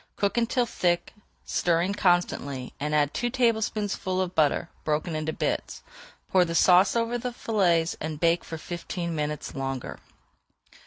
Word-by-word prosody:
Cook 200 -1 0
until 240 +1 +1
thick, 175 -6 0 0.3
stirring 175 +3 +1
constantly, 175 -9 0
and 150 +1 -1
add 145 -1 +2
two 240 - -1
tablespoonfuls 220 -6 0
of 185 -1 -2
butter, 155 +1 +2 0.2
broken 155 +2 -1
into 155 0 -2
bits. - - -3 0.5
Pour 185 -1 +5
the 165 -1 -3
sauce 185 +4 +5
over 235 +1 0
the 250 +1 -3
fillets 180 -8 +1
and 155 -1 -4
bake 170 +1 +2
for 165 - -6
fifteen 170 +1 -5
minutes 150 -1 -3
longer. 135 -2 -4
175 Hz, 145 wpm, -26 LUFS, 155-205 Hz, 0.5 s, Pour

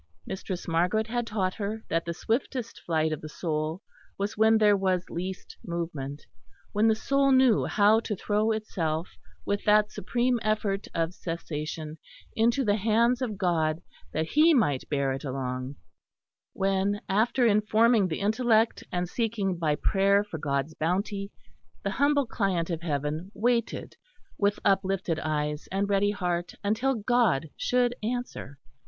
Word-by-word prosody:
Mistress 190 -1 -5
Margaret 180 +6 +1
had 240 +1 -2
taught 190 -4 -1
her 215 +1 -4
that 165 0 -1
the 170 - -2
swiftest 235 +3 -2
flight 160 -2 +1
of 155 - -3
the 155 - -7
soul 155 +3 -3 0.3
was 200 +2 -2
when 220 +1 +5
there 210 -1 +5
was 185 -2 0
least 185 +2 -5
movement, 160 -5 -5 0.5
when 215 +2 +3
the 220 - +4
soul 275 +4 +2
knew 260 -4 +5
how 210 +1 +4
to 220 -2 -3
throw 210 +3 0
itself 170 -7 -2 0.4
with 200 0 -1
that 210 0 +4
supreme 240 +4 0
effort 210 -2 -1
of 165 +1 0
cessation 155 -2 -5 0.4
into 235 +4 +2
the 205 0 +2
Hands 230 +4 +2
of 220 -6 -2
God, 165 -4 0 0.3
that 160 +1 -2
He 310 +2 +5
might 145 - +1
bear 140 -2 0
it 135 - -6
along: 130 0 -4 0.8
when, 195 +1 0
after 225 +5 +2
informing 215 0 +4
the 160 +1 -4
intellect 225 +1 +2
and 180 0 -1
seeking 210 -2 -1
by 160 -3 0
prayer 200 +4 +3
for 190 -6 -7
God's 140 +1 -1
bounty, 195 +5 -2 0.5
the - - -1
humble 285 0 +2
client 190 -7 -1
of 165 -1 -3
Heaven 155 +2 -2
waited 235 0 -1 0.4
with 205 0 +1
uplifted 190 -4 +1
eyes 150 -1 -2
and 195 +1 0
ready 200 0 +2
heart 180 -3 -2
until 235 +6 +1
God 210 - +1
should 245 -1 +1
answer. 230 - -4
195 Hz, 150 wpm, -27 LUFS, 165-220 Hz, 0.8 s, when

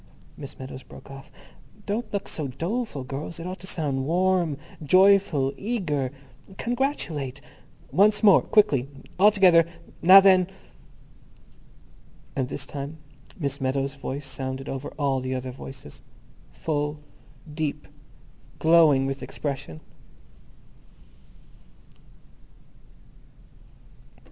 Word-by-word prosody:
_" - - -30 0.3
Miss 140 -2 -9
Meadows 130 0 -8
broke 140 - -14
off. 135 0 -11 0.5
"Don't 215 +2 -3
look 200 -1 -3
so 150 -3 -3
doleful, 170 - -3
girls. 140 +6 -6
It 165 - -7
ought 185 +1 -6
to 190 - -9
sound 140 -7 -1
warm, 175 -3 +1 0.2
joyful, 185 -4 +4
eager. 165 - -2 0.5
Congratulate. 205 - -2 0.5
Once 210 +3 +4
more. 200 -3 +7
Quickly. 145 - +2 0.3
All 205 +2 +8
together. 185 -5 +5 0.4
Now 185 +3 +10
then!" 190 -2 +5 1.9
And 130 -2 -1
this - - -4
time 145 +2 -7 0.4
Miss 140 -3 -3
Meadows' 135 +1 -1
voice 140 0 -6
sounded 135 0 -5
over 135 +1 -5
all 140 -3 +1
the 130 0 -3
other 130 0 -4
voices—full, 145 - -7 0.5
deep, 150 -2 -3 0.7
glowing 160 -5 +5
with 135 0 -3
expression. 135 - -5
150 Hz, 100 wpm, -25 LUFS, 135-185 Hz, 1.9 s, Now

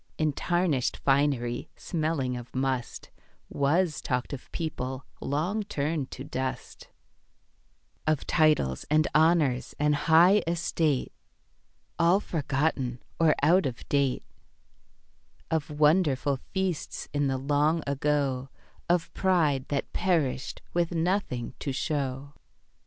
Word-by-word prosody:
In 155 -2 +1
tarnished 175 -6 0
finery 135 -4 +1
smelling 155 -7 -2
of 120 +1 -9
must, 130 -2 -2 0.4
Was 155 +3 +1
talked 125 +1 -2
of 135 - -8
people 130 -5 -4 0.2
long 165 +10 -1
turned 150 -7 -2
to - - -7
dust; 130 0 -5 1.2
Of 155 -2 +1
titles 150 - +2
and 155 +1 +3
honours 155 -5 +3
and 150 0 +2
high 165 +7 +5
estate, 160 -4 0 0.9
All 170 +3 +5
forgotten 140 -7 -1 0.2
or 160 -2 +4
out 170 +1 +5
of 125 -2 -7
date; 140 -3 +1 1.3
Of 160 -2 0
wonderful 150 -2 +2
feasts 190 -4 -2
in 145 -1 +1
the 135 -1 0
long 145 +4 +1
ago, 140 -2 0 0.4
Of 175 -1 +1
pride 160 -8 +2
that 140 -1 -3
perished 150 -8 0
with 170 -1 +1
nothing 165 -8 -1
to 140 - -3
show. 140 0 -3
150 Hz, 110 wpm, -28 LUFS, 135-165 Hz, 1.3 s, high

